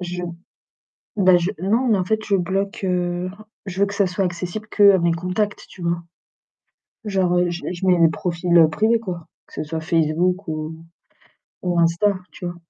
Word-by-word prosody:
Je 180 0 -4 0.9
bah 185 -3 +5
je 175 +2 0
non, 230 +6 +2
mais 210 -4 +3
en 180 - 0
fait, 220 +3 0
je 205 - +1
bloque, 195 +3 -2
heu, 180 0 -1 0.4
je 190 0 -5
veux 200 - +5
que 200 - -6
ça 200 -1 +2
soit 185 +2 -1
accessible 180 +4 -4
qu'à 200 -2 +6
mes 170 0 +2
contacts, 180 +5 -2
tu 180 - -12
vois. 170 0 -1 1.0
Genre, 190 -4 +1
heu, 175 0 +2
je 175 0 -5
je 180 +1 -4
mets 180 -2 +4
mon 165 -1 +5
profil 170 -1 +3
privé 225 +6 +2
quoi, 180 -7 -6 0.2
que - - -23
ce - - -3
soit 160 +1 -4
Facebook 165 +4 +1
ou 155 0 -4 0.9
ou 175 -1 0
Insta, 170 +5 +3 0.2
tu - - -9
vois. 175 0 -4
180 Hz, 185 wpm, -21 LUFS, 170-195 Hz, 1.0 s, qu'à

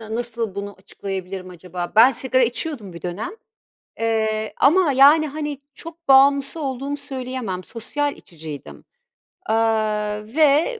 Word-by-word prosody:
ya, 220 0 -6
nasıl 235 -3 -3
bunu 200 0 -5
açıklayabilirim 190 -1 -6
acaba? 180 0 -6
Ben 240 +4 +8
sigara 260 +1 +1
içiyordum 240 - -2
bir 170 - -10
dönem, 180 +5 -4 0.7
eee, 220 -1 0
ama, 335 +1 +4
yani, 285 +4 +6
hani, 295 -1 -5
çok 335 +2 -11
bağımlısı 275 +3 +5
olduğumu 275 +1 -3
söyleyemem, 255 -9 -5
sosyal 285 +7 -3
içiciydim. 155 -4 -10 0.6
Aaa, 215 -2 0
ve 305 - +3
235 Hz, 120 wpm, -22 LUFS, 205-280 Hz, 0.7 s, Ben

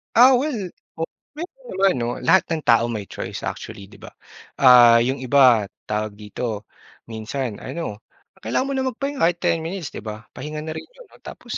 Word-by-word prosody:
Ah, 250 +2 +8
well, 245 -9 -2 0.2
o 160 - -8 0.3
mayro'n 370 +11 -9
naman 195 -1 +3
'no? 120 -1 -1
Lahat 190 - +4
ng 160 - -2
tao 115 -4 +4
may 110 -4 -5
choice - - -6
actually, 100 -1 -7
'di - - -15
ba? - - -12 0.5
Ah, 120 -3 +8
yung 130 +3 0
iba, 130 -5 +5 0.2
tawag 105 0 -2
dito, 105 +1 -6 0.4
minsan 110 +1 -4
ano 160 -11 -5 0.5
kailangan 120 - 0
mo 275 - -3
lang 265 0 0
magpahinga 275 0 -3
kahit 175 0 +2
10 175 -2 +2
minutes, 175 -3 -4
'di 105 - -9
ba? 110 0 -6
Pahinga 150 +2 -6
na 155 - -7
rin - - -7
'yon, - - -18 0.2
tapos - - -7
135 Hz, 180 wpm, -22 LUFS, -, 0.5 s, Ah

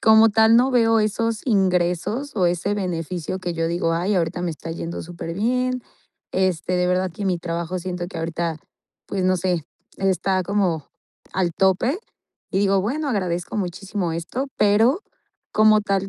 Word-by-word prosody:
como 220 0 +7
tal 220 +1 +5
no 255 +3 +4
veo 225 -3 +4
esos 220 +1 0
ingresos 190 - +1
o 185 -3 +3
ese 180 +4 0
beneficio 180 -2 -3
que 175 -1 -2
yo 165 0 -1
digo: 170 -1 0
"Ay, 180 +5 0
ahorita 175 0 0
me 175 - -1
está 165 +1 -7
yendo 165 +1 -5
súper 165 0 -6
bien". 250 +5 0 0.5
Este, 185 -1 +1
de 180 0 +2
verdad 180 +1 +1
que 205 - -5
mi 180 -2 +1
trabajo 170 +1 -3
siento 180 -1 -4
que 180 - -9
ahorita, 165 0 -2 0.5
pues, 190 -2 -2
no 185 0 +3
sé, 175 -3 -1 0.3
está 190 0 +1
como 185 -6 0 0.5
al 180 -2 0
tope 190 - +2 0.5
y 190 - +2
digo: 195 -1 +3
"Bueno, 280 +10 -2
agradezco 180 -2 -2
muchísimo 185 -1 -2
esto". 170 +12 -3
Pero, 225 - +4 0.5
como 215 0 +5
tal 195 -1 0
185 Hz, 165 wpm, -23 LUFS, 175-215 Hz, 0.5 s, como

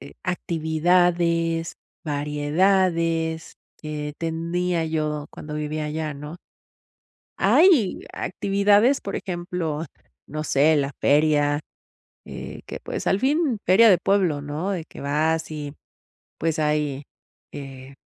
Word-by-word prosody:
eh, 70 - -11
actividades, 170 0 +1 0.3
variedades, 160 +2 0 0.3
eh, 150 -1 -4
tenía 170 +1 -1
yo 155 -2 -2
cuando 150 0 -8
vivía 150 0 -3
allá, 155 0 -3
¿no? 150 +4 -8 1.0
Hay 320 - +4
actividades, 205 +7 +2
por 200 - -5
ejemplo, 175 -3 -3 0.4
no 155 +1 -5
sé, 150 +2 +3
la 140 -1 0
feria, 145 0 +3 0.7
eh, - - -8
que - - -7
pues, - - -5
al 195 - +2
fin 275 -3 +1
feria 220 +5 +7
de 175 - +4
pueblo, 185 -7 +2
¿no?, 150 +7 -3
de 175 -4 -3
que - - -13
vas, 155 +3 0
y 150 -1 -6 0.6
pues 165 -1 0
hay, 150 -2 0 0.5
eh, 135 -1 -9
160 Hz, 115 wpm, -24 LUFS, 150-180 Hz, 1.0 s, feria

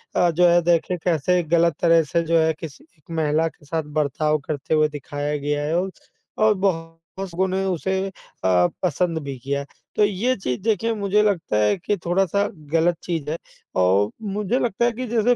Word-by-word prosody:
अ, 175 - +4
जो 175 +2 +4
है 175 0 +5
देखिए 175 +1 +1
कैसे 175 +1 +2
गलत 170 -2 +4
तरह 165 -1 +5
से 170 +3 0
जो 165 0 +2
है 160 0 +3
किसी 155 -5 -9
एक 155 - -32 0.2
महिला 155 +1 +2
के 160 -1 -12
साथ 160 +2 -2 0.2
बर्ताव 150 +1 +1
करते 145 0 -2
हुए 155 -1 +4
दिखाया 145 0 -4
गया 145 +1 -1
है 160 +3 0
और 190 +1 -2 0.5
और 215 0 +4
बहुत 165 -5 -1 0.2
लोगों 190 -1 -1
ने 190 +1 -1
उसे 190 +1 -1
अ, - - -7 0.7
पसंद 175 -1 0
भी 140 -2 -5
किया 140 +3 -2
है। 140 - -6 0.3
तो - - +4
ये 210 +6 0
चीज़ 125 -10 -3
देखिए 225 +2 +1
मुझे 210 0 +2
लगता 180 - 0
है 105 - +2
कि 200 +3 -1
थोड़ा-सा 195 +3 +2 0.3
गलत 170 +1 +3
चीज़ 165 -4 -3
है 165 - -2 0.4
और 95 +3 +3 0.3
मुझे 210 +4 0
लगता 235 0 0
है 240 - +3
कि 250 +3 -5
जैसे 235 +1 +3
170 Hz, 195 wpm, -23 LUFS, 155-195 Hz, 0.7 s, है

